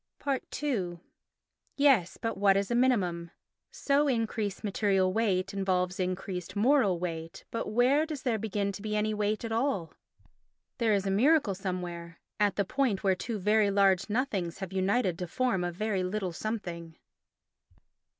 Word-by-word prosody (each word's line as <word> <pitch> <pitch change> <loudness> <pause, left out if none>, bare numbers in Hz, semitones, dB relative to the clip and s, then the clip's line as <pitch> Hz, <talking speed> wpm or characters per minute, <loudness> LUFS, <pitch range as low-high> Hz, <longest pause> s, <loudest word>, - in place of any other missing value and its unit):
ii 190 -12 -1 0.8
Yes, 270 -11 +3
but 225 - -2
what 195 0 +4
is 200 +3 -1
a - - +2
minimum? 190 -9 +1 0.4
So 285 +1 +1
increased 225 -5 -1
material 195 -2 +1
weight 190 -3 0
involves 190 -1 0
increased 185 -1 -3
moral 215 -4 +3
weight, 165 -2 -5
but 230 - -3
where 260 +7 +3
does 305 -4 -6
there 235 -5 0
begin 205 -1 -1
to 200 - -8
be 210 0 -3
any 215 +1 0
weight 210 +2 -1
at 225 - -5
all? 225 - -1 0.9
There 225 -3 +3
is 195 -1 -1
a 195 - 0
miracle 260 +2 +3
somewhere. 175 -3 -5 0.2
At 205 -1 +2
the 200 - 0
point 240 -3 0
where 195 -1 +4
two 220 +4 -4
very 210 +1 +3
large 195 -1 +3
nothings 205 -8 -1
have 190 -1 -6
united 190 -1 +1
to 180 - -3
form 215 -1 0
a 175 - -1
very 200 +2 -1
little 185 -1 -2
something. 170 -6 -5
200 Hz, 155 wpm, -29 LUFS, 185-225 Hz, 0.9 s, what